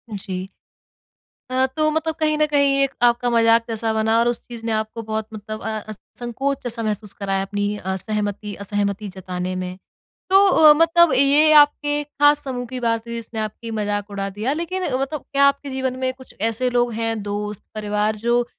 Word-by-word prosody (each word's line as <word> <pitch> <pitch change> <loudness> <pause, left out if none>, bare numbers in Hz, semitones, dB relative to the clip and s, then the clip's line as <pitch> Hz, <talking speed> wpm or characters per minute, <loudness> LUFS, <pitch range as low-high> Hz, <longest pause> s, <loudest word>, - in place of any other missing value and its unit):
जी। 190 -1 -5 1.0
अ, 260 +1 +2
तो 310 +4 0
मतलब 320 0 -1
कहीं 310 -1 +1
न 305 - +3
कहीं 280 -2 +3
एक 275 - 0
आपका 240 0 +3
मज़ाक 230 -1 +4
जैसा 225 0 -1
बना 220 +1 +2
और 235 - +3
उस 240 -1 -1
चीज़ 235 -2 -9
ने 230 - -1
आपको 220 +1 -2
बहुत 220 0 -3
मतलब 215 +1 -7
अ, 215 -1 -5 0.3
संकोच 270 +3 -2
जैसा 235 -2 -2
महसूस 210 -2 -3
कराया 195 -1 -2
अपनी 205 +1 -2
अ, 190 -1 -3
सहमति 210 +1 -3
असहमति 205 +1 -2
जताने 185 0 -4
में। 185 0 -5 0.5
तो 390 +1 +6
अ, 310 -5 +7
मतलब 330 0 +4
ये 280 +4 +5
आपके 290 0 0
ख़ास 290 0 +2
समूह 250 -2 -4
की 255 +1 -5
बात 230 -1 -1
हुई 235 - -5
जिसने 230 -1 -6
आपकी 220 +2 -5
मज़ाक 205 -1 -2
उड़ा 200 0 -3
दिया। 215 +7 -2
लेकिन 340 +4 -3
मतलब 275 +3 -2
क्या 280 0 +5
आपके 280 0 -1
जीवन 260 -1 -2
में 260 0 0
कुछ 260 0 -16
ऐसे 230 +3 +1
लोग 240 -1 +1
हैं, 225 -1 -2
दोस्त, 205 0 -4
परिवार 210 0 -1
जो 235 +3 +1
230 Hz, 185 wpm, -21 LUFS, 210-275 Hz, 1.0 s, अ